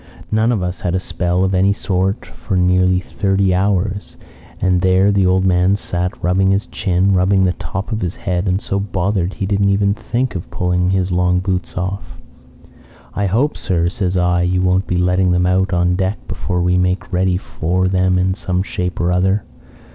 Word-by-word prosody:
None 110 Hz, +2 st, +2 dB
of 105 Hz, -6 st, -1 dB
us 90 Hz, +1 st, -4 dB
had 90 Hz, 0 st, -2 dB
a -, -, +1 dB
spell 90 Hz, 0 st, -1 dB
of 95 Hz, 0 st, 0 dB
any 95 Hz, +2 st, +3 dB
sort 95 Hz, +1 st, -1 dB
for 85 Hz, +2 st, -4 dB
nearly 90 Hz, 0 st, +3 dB
thirty 95 Hz, 0 st, 0 dB
hours, 100 Hz, +1 st, -1 dB, 0.4 s
and 90 Hz, -1 st, +1 dB
there 95 Hz, +2 st, +3 dB
the 100 Hz, -2 st, +2 dB
old 95 Hz, +1 st, +2 dB
man 90 Hz, +1 st, +3 dB
sat 90 Hz, -2 st, -3 dB
rubbing 95 Hz, +2 st, +2 dB
his 100 Hz, +2 st, +1 dB
chin, 95 Hz, 0 st, 0 dB
rubbing 95 Hz, +1 st, +3 dB
the 90 Hz, -1 st, +2 dB
top 95 Hz, +5 st, -6 dB
of 110 Hz, 0 st, -2 dB
his 90 Hz, -2 st, -3 dB
head, 90 Hz, +1 st, -2 dB
and 95 Hz, +1 st, +1 dB
so 100 Hz, -1 st, -2 dB
bothered 95 Hz, -1 st, -1 dB
he 100 Hz, -, -3 dB
didn't 100 Hz, 0 st, +1 dB
even 100 Hz, 0 st, +2 dB
think 120 Hz, +3 st, -2 dB
of 90 Hz, -, -6 dB
pulling 90 Hz, 0 st, 0 dB
his 95 Hz, -1 st, 0 dB
long 90 Hz, 0 st, +2 dB
boots 90 Hz, -1 st, -3 dB
off. 95 Hz, +2 st, -4 dB, 1.0 s
"'I 100 Hz, -, -1 dB
hope, 125 Hz, +10 st, +1 dB
sir,' 85 Hz, -3 st, 0 dB
says 95 Hz, 0 st, -2 dB
I, 90 Hz, 0 st, +2 dB
'you 90 Hz, +1 st, +1 dB
won't 95 Hz, +1 st, +1 dB
be 90 Hz, -, -1 dB
letting 90 Hz, 0 st, +2 dB
them 90 Hz, 0 st, +2 dB
out 95 Hz, +1 st, +1 dB
on 90 Hz, 0 st, +2 dB
deck 95 Hz, +3 st, -1 dB
before 90 Hz, -1 st, -2 dB
we 90 Hz, 0 st, +2 dB
make 90 Hz, +1 st, -1 dB
ready 90 Hz, 0 st, +1 dB
for 90 Hz, 0 st, -1 dB
them 95 Hz, -1 st, +2 dB
in 95 Hz, +1 st, +1 dB
some 95 Hz, -1 st, -2 dB
shape 90 Hz, -2 st, -4 dB
or 85 Hz, +1 st, +1 dB
other.' 95 Hz, +3 st, +1 dB
95 Hz, 195 wpm, -18 LUFS, 90-95 Hz, 1.0 s, any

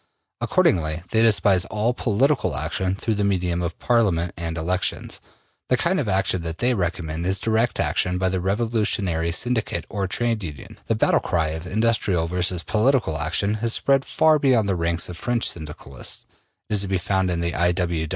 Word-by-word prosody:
Accordingly 80 Hz, -1 st, +1 dB
they 110 Hz, -, +3 dB
despise 105 Hz, -4 st, +4 dB
all 110 Hz, +3 st, 0 dB
POLITICAL 120 Hz, -, +1 dB
action 90 Hz, +7 st, -1 dB
through 110 Hz, +3 st, -2 dB
the 105 Hz, -1 st, -1 dB
medium 90 Hz, -3 st, 0 dB
of 85 Hz, -1 st, -3 dB
Parliament 95 Hz, -8 st, +1 dB
and 85 Hz, -1 st, -4 dB
elections: 90 Hz, +3 st, -1 dB, 0.5 s
the 130 Hz, -, +3 dB
kind 180 Hz, +7 st, +1 dB
of 125 Hz, -8 st, -1 dB
action 95 Hz, -1 st, +1 dB
that 80 Hz, 0 st, -4 dB
they 125 Hz, +1 st, +2 dB
recommend 85 Hz, -5 st, -2 dB
is 95 Hz, +1 st, +1 dB
direct 115 Hz, +3 st, 0 dB
action 90 Hz, 0 st, +1 dB
by 95 Hz, +1 st, 0 dB
the 95 Hz, -1 st, -2 dB
revolutionary 100 Hz, -5 st, 0 dB
syndicate 115 Hz, +6 st, -1 dB
or 100 Hz, -3 st, -2 dB
trade 115 Hz, +1 st, -1 dB
union. 75 Hz, -5 st, -9 dB
The -, -, +1 dB
battle -, -, +3 dB
cry 80 Hz, -2 st, 0 dB
of 80 Hz, +3 st, -6 dB
industrial 105 Hz, -4 st, +1 dB
versus 90 Hz, 0 st, -1 dB
political 110 Hz, -, +1 dB
action 100 Hz, +4 st, 0 dB
has 115 Hz, -1 st, +1 dB
spread 135 Hz, -1 st, +2 dB
far 155 Hz, +1 st, +3 dB
beyond 125 Hz, -7 st, +3 dB
the 95 Hz, -, +1 dB
ranks 85 Hz, -1 st, 0 dB
of 90 Hz, -, -8 dB
French 120 Hz, +3 st, 0 dB
Syndicalism. 75 Hz, -5 st, -4 dB, 0.4 s
It -, -, -4 dB
is 105 Hz, -, +1 dB
to 100 Hz, -, -2 dB
be 95 Hz, 0 st, 0 dB
found 95 Hz, +1 st, 0 dB
in 85 Hz, -1 st, -1 dB
the 85 Hz, 0 st, -1 dB
I. 90 Hz, 0 st, +2 dB
95 Hz, 180 wpm, -23 LUFS, 85-115 Hz, 0.5 s, despise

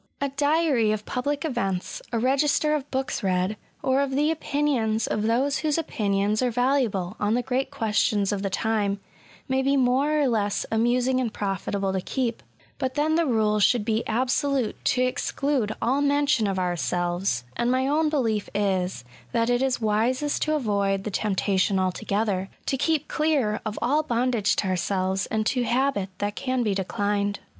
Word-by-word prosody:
A 280 Hz, -, -1 dB
diary 285 Hz, -5 st, +2 dB
of 215 Hz, -1 st, -3 dB
public 285 Hz, +4 st, -2 dB
events, 195 Hz, -, -2 dB
a 235 Hz, -, 0 dB
register 280 Hz, +5 st, +2 dB
of 290 Hz, -2 st, -2 dB
books 265 Hz, -1 st, -2 dB
read, 185 Hz, +1 st, 0 dB, 0.3 s
or 265 Hz, +1 st, +2 dB
of 280 Hz, -, 0 dB
the 300 Hz, +3 st, +2 dB
opinions 275 Hz, -8 st, 0 dB
of 210 Hz, -, -1 dB
those 250 Hz, +6 st, +1 dB
whose 305 Hz, -1 st, 0 dB
opinions 210 Hz, -7 st, 0 dB
are 250 Hz, -, +2 dB
valuable 240 Hz, -7 st, 0 dB
on 210 Hz, +2 st, +1 dB
the 245 Hz, -, 0 dB
great 265 Hz, +2 st, -1 dB
questions 215 Hz, -5 st, +1 dB
of 200 Hz, -2 st, -2 dB
the 195 Hz, -, -1 dB
time, 205 Hz, -1 st, 0 dB, 0.5 s
may 265 Hz, -1 st, +1 dB
be 275 Hz, +1 st, +2 dB
more 270 Hz, +4 st, +2 dB
or 285 Hz, -, +3 dB
less 210 Hz, -4 st, 0 dB
amusing 245 Hz, +3 st, +2 dB
and 245 Hz, -3 st, -1 dB
profitable 195 Hz, -1 st, -2 dB
to 190 Hz, -, -1 dB
keep; 235 Hz, +3 st, -2 dB, 0.4 s
but 260 Hz, -2 st, -2 dB
then 305 Hz, +1 st, +1 dB
the 330 Hz, 0 st, +2 dB
rule 215 Hz, -3 st, +2 dB
should 225 Hz, 0 st, +3 dB
be 220 Hz, 0 st, 0 dB
absolute 255 Hz, +1 st, 0 dB
to 255 Hz, -, +2 dB
exclude 255 Hz, -2 st, 0 dB
all 265 Hz, +4 st, +2 dB
mention 285 Hz, -5 st, +2 dB
of 195 Hz, -1 st, -1 dB
ourselves: 175 Hz, -4 st, -1 dB
and 240 Hz, -, 0 dB
my 260 Hz, +1 st, +2 dB
own 305 Hz, +2 st, +2 dB
belief 225 Hz, -9 st, 0 dB
is, 190 Hz, -7 st, 0 dB, 0.3 s
that 230 Hz, +1 st, +2 dB
it 245 Hz, +1 st, +2 dB
is 265 Hz, -1 st, +1 dB
wisest 240 Hz, +7 st, 0 dB
to 310 Hz, 0 st, +1 dB
avoid 200 Hz, -7 st, 0 dB
the 210 Hz, -, -4 dB
temptation 195 Hz, -1 st, +1 dB
altogether 190 Hz, +1 st, -1 dB
— -, -, -36 dB
to -, -, 0 dB
keep 305 Hz, +2 st, 0 dB
clear 290 Hz, -9 st, 0 dB
of 215 Hz, 0 st, -4 dB
all 285 Hz, +6 st, +3 dB
bondage 240 Hz, -6 st, +1 dB
to -, -, -1 dB
ourselves 185 Hz, +1 st, 0 dB
and 220 Hz, -1 st, -1 dB
to 250 Hz, +2 st, +1 dB
habit 245 Hz, -5 st, 0 dB
that 205 Hz, 0 st, -2 dB
can 255 Hz, -2 st, -1 dB
be 210 Hz, -3 st, +1 dB
declined. 200 Hz, +1 st, -1 dB
235 Hz, 175 wpm, -25 LUFS, 205-275 Hz, 0.5 s, or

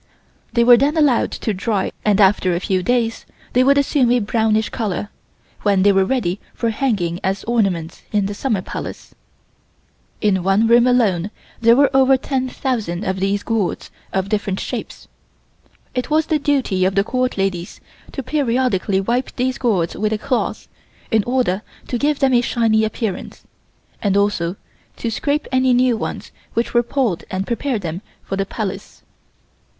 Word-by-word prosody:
They 235 Hz, -, +4 dB
were 240 Hz, 0 st, +8 dB
then 290 Hz, +6 st, +1 dB
allowed 285 Hz, -6 st, +3 dB
to 220 Hz, -, -2 dB
dry 200 Hz, +1 st, -1 dB
and 210 Hz, -1 st, +2 dB
after 190 Hz, -3 st, +4 dB
a -, -, 0 dB
few 185 Hz, 0 st, 0 dB
days 230 Hz, +1 st, 0 dB, 0.3 s
they 250 Hz, -, +4 dB
would 280 Hz, +2 st, +4 dB
assume 280 Hz, -3 st, +2 dB
a 250 Hz, -, +4 dB
brownish 220 Hz, 0 st, +1 dB
color, 205 Hz, -2 st, -3 dB, 0.5 s
when 200 Hz, -2 st, +2 dB
they 205 Hz, -, +6 dB
were 195 Hz, -1 st, +3 dB
ready 205 Hz, -6 st, -1 dB, 0.2 s
for 230 Hz, -1 st, 0 dB
hanging 205 Hz, -9 st, -1 dB
as 195 Hz, +1 st, -1 dB
ornaments 195 Hz, -9 st, -1 dB
in 205 Hz, -2 st, +1 dB
the 200 Hz, -, -3 dB
Summer 205 Hz, -3 st, -1 dB
Palace. -, -, -7 dB, 1.1 s
In 200 Hz, -4 st, +2 dB
one 195 Hz, +4 st, +2 dB
room 235 Hz, +2 st, +5 dB
alone 210 Hz, -7 st, +2 dB, 0.3 s
there 230 Hz, 0 st, +6 dB
were 280 Hz, 0 st, +3 dB
over 265 Hz, 0 st, +5 dB
10,000 255 Hz, -8 st, -2 dB
of 190 Hz, -2 st, -2 dB
these 195 Hz, +1 st, 0 dB
gourds, 225 Hz, -5 st, -2 dB, 0.2 s
of 190 Hz, 0 st, -1 dB
different 205 Hz, -2 st, -1 dB
shapes. -, -, -6 dB, 0.9 s
It 250 Hz, -1 st, -2 dB
was 310 Hz, +1 st, +2 dB
the 315 Hz, -2 st, +1 dB
duty 270 Hz, -10 st, +1 dB
of 190 Hz, +1 st, +1 dB
the 195 Hz, -, +3 dB
Court 255 Hz, +2 st, -1 dB
ladies 190 Hz, -3 st, -2 dB, 0.3 s
to 270 Hz, -, -4 dB
periodically 250 Hz, -8 st, 0 dB
wipe 240 Hz, +6 st, -1 dB
these 255 Hz, +1 st, -1 dB
gourds 190 Hz, -9 st, 0 dB
with 215 Hz, +1 st, -1 dB
a 220 Hz, -, 0 dB
cloth, 250 Hz, +4 st, -2 dB, 0.4 s
in 220 Hz, -3 st, +3 dB
order 240 Hz, -6 st, 0 dB, 0.3 s
to 245 Hz, -, -1 dB
give 295 Hz, +2 st, +1 dB
them 270 Hz, -2 st, +2 dB
a 240 Hz, -, +5 dB
shiny 225 Hz, -3 st, +2 dB
appearance, 220 Hz, -2 st, -4 dB, 0.6 s
and 200 Hz, -1 st, +1 dB
also 200 Hz, -4 st, 0 dB, 0.4 s
to 230 Hz, -, -3 dB
scrape 290 Hz, +6 st, -1 dB
any 260 Hz, -1 st, +3 dB
new 250 Hz, -1 st, +3 dB
ones -, -, -5 dB, 0.2 s
which 230 Hz, -, -1 dB
were 240 Hz, -, +5 dB
pulled 240 Hz, -7 st, -1 dB
and 190 Hz, +1 st, -2 dB
prepare 245 Hz, +2 st, -1 dB
them 175 Hz, -2 st, -5 dB, 0.2 s
for 195 Hz, -, -4 dB
the 195 Hz, 0 st, -2 dB
Palace. 200 Hz, -3 st, -6 dB
220 Hz, 165 wpm, -19 LUFS, 195-255 Hz, 1.1 s, were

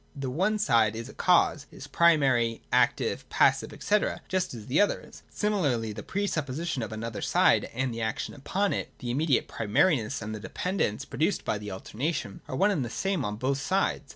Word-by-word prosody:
The 135 Hz, -2 st, -4 dB
one 190 Hz, +10 st, +1 dB
side 115 Hz, -, +3 dB
is 115 Hz, +3 st, -6 dB
a -, -, -11 dB
cause, 170 Hz, -5 st, +3 dB
is -, -, -10 dB
primary, 135 Hz, -9 st, +3 dB
active, -, -, +1 dB
passive, -, -, +3 dB
&c., 210 Hz, -, +4 dB, 0.3 s
just 185 Hz, -1 st, -1 dB
as 110 Hz, -3 st, -9 dB
the 135 Hz, -, +2 dB
other 205 Hz, -, +2 dB
is. -, -, -14 dB
Similarly 145 Hz, -, 0 dB
the 105 Hz, -, -7 dB
pre 200 Hz, -, -2 dB
supposition 155 Hz, -3 st, -2 dB
of 110 Hz, -, -4 dB
another 110 Hz, 0 st, -5 dB
side -, -, +3 dB
and 125 Hz, 0 st, -2 dB
the 115 Hz, -, -4 dB
action 110 Hz, -1 st, -2 dB
upon 190 Hz, +8 st, -1 dB
it, -, -, -3 dB
the 120 Hz, -2 st, -4 dB
immediate 140 Hz, +1 st, +1 dB
primariness 115 Hz, -, +1 dB
and 110 Hz, 0 st, -5 dB
the 110 Hz, -, -5 dB
dependence 180 Hz, -, -2 dB
produced -, -, -1 dB
by 105 Hz, -, -1 dB
the 105 Hz, 0 st, -7 dB
alter 95 Hz, +3 st, -9 dB
nation, 145 Hz, -9 st, -2 dB
are -, -, -4 dB
one 200 Hz, +9 st, +3 dB
and 160 Hz, -9 st, 0 dB
the 120 Hz, -, -4 dB
same 190 Hz, -, -1 dB
on 105 Hz, -2 st, -2 dB
both 135 Hz, +5 st, -1 dB
sides. 185 Hz, -3 st, 0 dB
135 Hz, 200 wpm, -28 LUFS, 115-175 Hz, 0.3 s, c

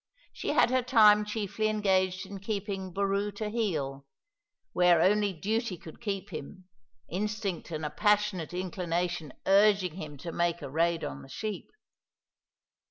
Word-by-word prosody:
She -, -, -7 dB
had -, -, +4 dB
her 255 Hz, 0 st, +3 dB
time 215 Hz, -4 st, +6 dB
chiefly 210 Hz, 0 st, -2 dB
engaged 190 Hz, -3 st, +1 dB
in 195 Hz, 0 st, -8 dB
keeping 195 Hz, -2 st, -4 dB
Boroo 200 Hz, +2 st, 0 dB
to 210 Hz, 0 st, -3 dB
heel, 150 Hz, -12 st, -2 dB, 0.7 s
where 180 Hz, -2 st, +5 dB
only 205 Hz, +3 st, +3 dB
duty 205 Hz, +4 st, -2 dB
could 170 Hz, +1 st, -12 dB
keep 200 Hz, -3 st, -4 dB
him, 180 Hz, +4 st, -8 dB, 0.4 s
instinct 205 Hz, 0 st, -3 dB
and 155 Hz, -2 st, -4 dB
a 150 Hz, -, -3 dB
passionate 210 Hz, -5 st, +1 dB
inclination 175 Hz, -3 st, -2 dB
urging 195 Hz, -3 st, +4 dB
him 150 Hz, -5 st, -7 dB
to 170 Hz, +5 st, -6 dB
make 170 Hz, 0 st, 0 dB
a 135 Hz, -, -6 dB
raid 165 Hz, +2 st, +1 dB
on 70 Hz, 0 st, -5 dB
the -, -, -13 dB
sheep. 215 Hz, -3 st, -5 dB
190 Hz, 145 wpm, -29 LUFS, 170-210 Hz, 0.7 s, time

